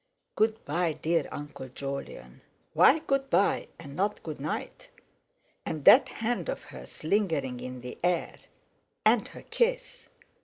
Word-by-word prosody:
"Good 220 0 +1
bye, 165 +2 0
dear 165 0 0
Uncle 145 -2 -7
Jolyon." 135 - -7 0.3
Why 290 - +6
"Good 275 -1 0
bye" 190 +4 +2
and 140 -4 -9
not 200 +4 -1
"Good 155 -3 -6
night". 150 +3 -5 0.7
And 150 -3 -5
that 265 - +8
hand 240 - -2
of - - -3
hers - - -11
lingering 155 -9 0
in 125 0 -7
the 125 - -8
air. 175 -1 0 0.7
And - - +4
her - - -12
kiss. - - -1
165 Hz, 140 wpm, -28 LUFS, 140-220 Hz, 0.7 s, that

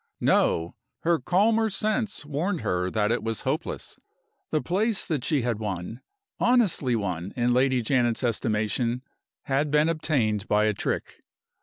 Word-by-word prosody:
No! 80 +1 +2 0.3
Her 170 -1 +2
calmer 220 +5 +2
sense 215 -3 -2
warned 155 +5 -2
her 90 0 0
that 105 +2 0
it 120 - 0
was 115 0 -3
hopeless. - - -4 0.5
The 155 - +1
place 200 +4 0
she 140 0 +1
had 115 -3 -1
won 105 +2 -5 0.4
honestly 210 - +3
won 95 -4 -3
in 120 -1 +2
Lady 130 -1 +2
Janet's 120 0 +1
estimation 115 +1 0 0.4
had 140 +2 0
been 150 +2 +3
obtained 125 -11 0
by 105 +1 +3
a 110 - +2
trick. - - -4
125 Hz, 140 wpm, -26 LUFS, 110-165 Hz, 0.5 s, honestly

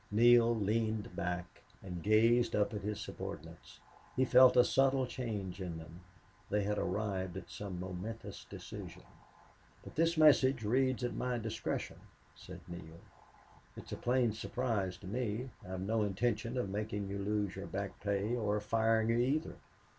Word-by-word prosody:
Neale 120 +2 +6
leaned 110 -2 -1
back 90 -1 -4 0.2
and 90 -3 -6
gazed 115 +3 +4
up 105 +3 +1
at 105 - -3
his 105 +1 -3
subordinates. - - -8 0.4
He 130 - +3
felt 125 0 +7
a 125 - +9
subtle 135 0 +3
change 105 -7 -4
in 85 -3 -4
them. 80 +1 -10 0.5
They 105 0 +1
had 105 +1 0
arrived 95 -2 -2
at 90 - -9
some 100 -3 -6
momentous 95 +5 -6
decision. - - -9 0.8
"But - - -10
this 165 +1 +2
message 135 -5 +5
reads 130 +3 +1
at 120 - -1
my 125 -1 -1
discretion," 110 -1 -3 0.4
said - - -11
Neale. 85 -1 -9 0.8
"It's - - -10
a - - -2
plain 120 -2 +1
surprise 110 -5 -2
to 95 - -11
me. 120 +3 -2
I've 95 -1 -5
no 110 +3 0
intention 110 +4 -1
of 125 - 0
making 105 0 -3
you 100 +1 -4
lose 100 -1 -1
your 95 +1 -6
back 100 0 -4
pay, 100 +3 0
or 105 -3 0
of 105 - -2
firing 110 +1 +2
you, 115 +1 +3
either." 140 +6 +1
105 Hz, 160 wpm, -34 LUFS, 100-120 Hz, 0.8 s, a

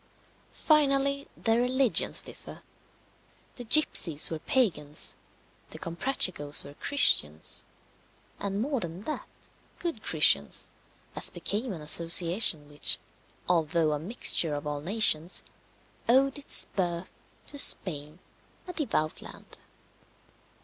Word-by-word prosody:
Finally, 280 -2 0
their 225 +1 0
religions 255 -1 +1
differ - - -12 0.9
the 245 - -8
gipsies 205 - +2
were 160 - -5
Pagans, 160 - -2 0.5
the - - -10
Comprachicos 170 - -1
were 140 - -12
Christians, 80 - 0 0.7
and 200 +1 -3
more 275 -1 -3
than 170 0 -7
that, 305 - -7 0.5
good 335 -11 -5
Christians, 75 - +2 0.4
as - - +5
became 220 +4 -4
an 170 -5 -8
association 165 +1 +5
which, 145 0 +4 0.5
although 165 -2 0
a 150 - -3
mixture 165 -4 +2
of 145 +1 -7
all 145 -1 -5
nations, 180 -2 +1 0.7
owed 270 +3 +2
its 285 - +3
birth 175 -2 -4 0.3
to 285 - -3
Spain, 150 - +1 0.5
a 360 - -7
devout 210 - -3
land. - - -12
180 Hz, 110 wpm, -27 LUFS, 155-260 Hz, 0.9 s, as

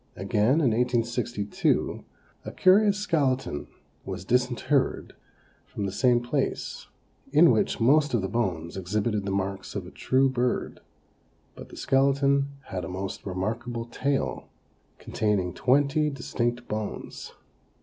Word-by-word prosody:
Again, 110 - +2
in 130 -6 +3
1862, 120 -2 0 0.4
a - - -6
curious 200 +2 +4
skeleton 140 - 0 0.4
was 95 -2 -6
disinterred 125 +3 0 0.5
from 100 - -4
the 95 - -2
same 120 +4 +3
place, 120 - -3 0.4
in - - +7
which - - +1
most 140 +3 +4
of 110 - 0
the - - 0
bones 90 -7 -2
exhibited 100 +3 -1
the 100 - -2
marks 95 0 -3
of 100 -3 -3
a 90 - -11
true 130 +1 +2
bird, 125 -1 -1 0.7
but - - -11
the - - -12
skeleton 140 +1 +2 0.2
had 90 -1 -4
a 80 - -5
most 95 +2 -5
remarkable 115 +5 -3
tail, 135 +3 -2 0.5
containing 100 -5 -1
twenty 145 - +2
distinct 120 -3 -3
bones. 105 -1 -5
120 Hz, 125 wpm, -26 LUFS, 100-135 Hz, 0.7 s, in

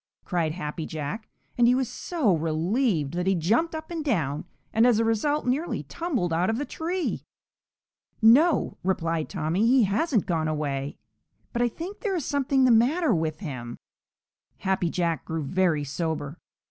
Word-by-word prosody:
cried 165 -4 0
Happy 155 -2 -5
Jack, 160 +9 -5 0.3
and 240 - +6
he 250 - +5
was 260 -1 0
so 270 - 0
relieved 165 - 0
that 180 +1 -2
he 195 - +3
jumped 230 - +1
up 315 +1 -7
and 330 -2 -3
down 160 - -1 0.3
and 225 +2 +5
as 240 -3 +4
a 230 - +2
result 290 +7 +1
nearly 275 +7 -1
tumbled 260 - -2
out 175 +4 +1
of 225 - 0
the 290 - -2
tree. 345 +4 -3 1.0
"No," 280 +10 +4
replied 165 -4 -1
Tommy, 180 +4 0
"he 255 0 +5
hasn't 220 - +1
gone 160 -3 0
away, 145 -2 -2 0.6
but 240 - 0
I 245 - +4
think 340 - -7
there 410 -5 -1
is 330 - -2
something 275 -2 +2
the 250 - +5
matter 265 +6 +3
with 160 -2 -2
him." 125 - -6 0.8
Happy 190 -3 0
Jack 170 -2 -1
grew 160 -1 -3
very 170 0 +1
sober. 150 +2 -3
195 Hz, 165 wpm, -26 LUFS, 160-265 Hz, 1.0 s, and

